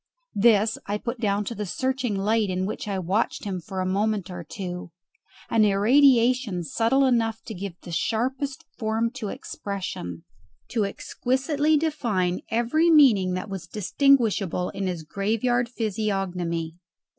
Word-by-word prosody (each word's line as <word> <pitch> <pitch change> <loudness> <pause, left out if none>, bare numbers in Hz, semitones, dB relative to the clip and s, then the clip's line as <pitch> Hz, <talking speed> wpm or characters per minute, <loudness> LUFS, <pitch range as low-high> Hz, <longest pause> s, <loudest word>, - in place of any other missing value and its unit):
This 220 0 +3
I 205 +1 -1
put 235 +3 -5
down 205 -1 0
to 235 - -3
the 210 -2 -4
searching 260 +4 -1
light 210 +2 +1
in 185 0 -1
which 210 - -4
I 200 -2 -1
watched 190 +5 -1
him 190 -4 -3
for 190 +2 -5
a - - -1
moment 200 0 0
or 175 -1 -6
two, 180 +1 -6 0.6
an 225 -1 +4
irradiation 235 -1 +4
subtle 230 - +2
enough 225 -3 +1
to 225 - -7
give 185 -2 -7
the 175 - -8
sharpest 260 - -1
form 225 0 0
to 250 -4 -5
expression, 185 - -5 0.5
to 220 -4 0
exquisitely 275 +8 0
define 230 - 0
every 240 +9 +2
meaning 235 - +5
that 185 +3 -4
was 190 -4 -6
distinguishable 210 - +2
in 195 -1 -3
his 175 -3 -3
graveyard 225 +7 0
physiognomy. 190 -7 -2
210 Hz, 145 wpm, -25 LUFS, 185-240 Hz, 0.6 s, meaning